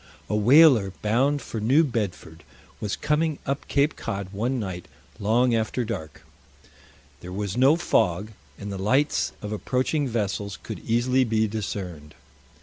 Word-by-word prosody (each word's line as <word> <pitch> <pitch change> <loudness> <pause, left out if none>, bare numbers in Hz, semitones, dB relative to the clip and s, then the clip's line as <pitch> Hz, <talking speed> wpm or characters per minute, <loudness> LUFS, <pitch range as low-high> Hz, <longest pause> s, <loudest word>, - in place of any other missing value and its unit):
A - - +1
whaler 120 - +6
bound 135 +7 +1
for 115 - -5
New 130 +9 +4
Bedford 95 - -4 0.4
was 105 -2 -2
coming 155 0 0
up 140 +1 -3
Cape 145 +1 +1
Cod 100 -1 -5
one 120 +6 -1
night 95 -5 -5 0.3
long 120 +4 +2
after 115 +2 0
dark. 95 -9 -6 0.9
There 90 - -9
was 100 +1 -3
no 135 +5 +5
fog, 105 - +1 0.3
and 100 0 -6
the 100 - -5
lights 130 +10 +1
of 105 - -5
approaching 130 +7 -1
vessels 100 -3 -2
could - - -6
easily 125 +3 +1
be 110 -2 +1
discerned. 90 -8 -5
110 Hz, 145 wpm, -25 LUFS, 100-130 Hz, 0.9 s, whaler